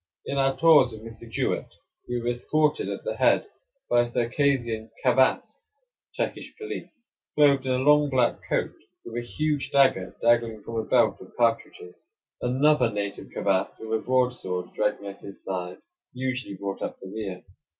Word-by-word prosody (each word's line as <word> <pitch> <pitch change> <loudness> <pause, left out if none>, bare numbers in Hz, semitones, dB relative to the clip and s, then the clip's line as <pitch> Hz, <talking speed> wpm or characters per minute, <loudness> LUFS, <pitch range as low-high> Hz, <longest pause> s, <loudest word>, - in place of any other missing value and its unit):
In 140 - -2
our 135 0 +2
tours 150 -7 +6
with 110 0 -10
Mr. 115 0 -10
Jewett - - -2 0.3
we 120 0 -1
were 120 +1 -2
escorted 150 +5 +1
at - - -5
the - - -3
head - - +3 0.4
by 120 - +4
a 120 - -1
Circassian 120 -2 0 0.2
cavass 130 +1 +3 0.6
(Turkish - - -4
police), 415 - -8 0.3
clothed 140 -3 +4
in 130 - +2
a - - +1
long 150 +2 +4
black 130 -3 +2
coat, - - 0 0.3
with 120 +1 -4
a - - -11
huge 150 +1 -1
dagger 130 -9 +3
dangling 115 -2 +2
from 115 - -5
a 110 - -1
belt - - +3
of - - -14
cartridges. 115 -6 0 0.5
Another 130 0 +3
native 100 -1 -4
cavass, 95 -2 0
with 110 0 -5
a 110 - +1
broadsword 125 -8 -1
dragging 105 -1 -1
at 100 0 -8
his 100 - -11
side, 90 -1 -4 0.4
usually 130 -4 -3
brought 100 0 -5
up - - -4
the - - -10
rear. 95 -2 -6
120 Hz, 165 wpm, -26 LUFS, 110-135 Hz, 0.6 s, tours